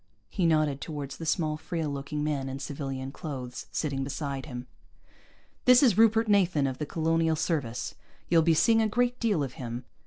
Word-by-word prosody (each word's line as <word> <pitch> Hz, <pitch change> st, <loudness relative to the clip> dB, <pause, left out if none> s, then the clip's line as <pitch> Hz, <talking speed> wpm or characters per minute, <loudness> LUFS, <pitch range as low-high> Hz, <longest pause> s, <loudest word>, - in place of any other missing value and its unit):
He 180 Hz, -5 st, +1 dB
nodded 155 Hz, -4 st, +2 dB
toward 145 Hz, -1 st, -5 dB
the 165 Hz, +3 st, -6 dB
small, 155 Hz, -2 st, 0 dB
frail 160 Hz, 0 st, -3 dB
looking 145 Hz, +1 st, -3 dB
man 140 Hz, -3 st, -1 dB
in 135 Hz, -, -4 dB
civilian 135 Hz, -1 st, -5 dB
clothes, 130 Hz, -5 st, -6 dB
sitting 140 Hz, -3 st, -2 dB
beside 140 Hz, 0 st, -4 dB
him. 125 Hz, -3 st, -6 dB, 1.0 s
"This 250 Hz, +1 st, +7 dB
is 235 Hz, -8 st, +5 dB
Rupert 225 Hz, +1 st, +4 dB
Nathan, 185 Hz, -8 st, +3 dB
of 130 Hz, -1 st, -3 dB
the 150 Hz, -, -3 dB
Colonial 165 Hz, 0 st, +1 dB
Service. 140 Hz, -7 st, -2 dB, 0.3 s
You'll 165 Hz, -1 st, +5 dB
be 165 Hz, 0 st, +3 dB
seeing 225 Hz, +7 st, +4 dB
a 220 Hz, -, +2 dB
great 245 Hz, +3 st, 0 dB
deal 205 Hz, -10 st, +1 dB
of 130 Hz, -2 st, -5 dB
him." 120 Hz, 0 st, -5 dB
155 Hz, 180 wpm, -28 LUFS, 135-170 Hz, 1.0 s, This